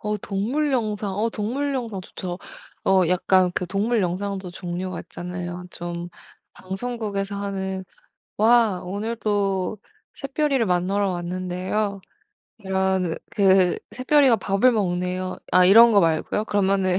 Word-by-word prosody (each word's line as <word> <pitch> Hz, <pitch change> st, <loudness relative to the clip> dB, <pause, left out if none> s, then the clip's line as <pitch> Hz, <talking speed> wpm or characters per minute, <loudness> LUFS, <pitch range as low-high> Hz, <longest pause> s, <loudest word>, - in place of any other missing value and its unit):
어 210 Hz, 0 st, -2 dB
동물 240 Hz, +11 st, -1 dB
영상, 210 Hz, -5 st, -1 dB
어 220 Hz, +2 st, +1 dB
동물 270 Hz, +8 st, -2 dB
영상 230 Hz, -6 st, -3 dB
좋죠. 180 Hz, -1 st, -6 dB, 0.5 s
어 190 Hz, -1 st, +4 dB
약간 180 Hz, 0 st, +3 dB
그 180 Hz, -, -2 dB
동물 210 Hz, +5 st, 0 dB
영상도 190 Hz, +1 st, -3 dB
종류가 180 Hz, 0 st, -5 dB
있잖아요. 180 Hz, 0 st, -6 dB
좀 175 Hz, 0 st, -5 dB, 0.5 s
방송국에서 200 Hz, 0 st, -4 dB
하는 190 Hz, -1 st, -3 dB, 0.5 s
"와 220 Hz, -4 st, +4 dB
오늘도 205 Hz, -1 st, -1 dB, 0.4 s
샛별이를 275 Hz, -2 st, 0 dB
만나러 190 Hz, +2 st, +1 dB
왔는데요. 185 Hz, +3 st, -2 dB, 0.6 s
이런 190 Hz, -3 st, 0 dB
그 190 Hz, -3 st, +4 dB
샛별이가 260 Hz, -1 st, +4 dB
밥을 200 Hz, +6 st, +2 dB
먹네요." 185 Hz, -2 st, -1 dB
아 185 Hz, -, +6 dB
이런 225 Hz, +5 st, +8 dB
거 200 Hz, -, +6 dB
말고요. 165 Hz, +5 st, 0 dB
그러면은 195 Hz, -3 st, +1 dB
195 Hz, 260 characters per minute, -23 LUFS, 185-215 Hz, 0.6 s, 이런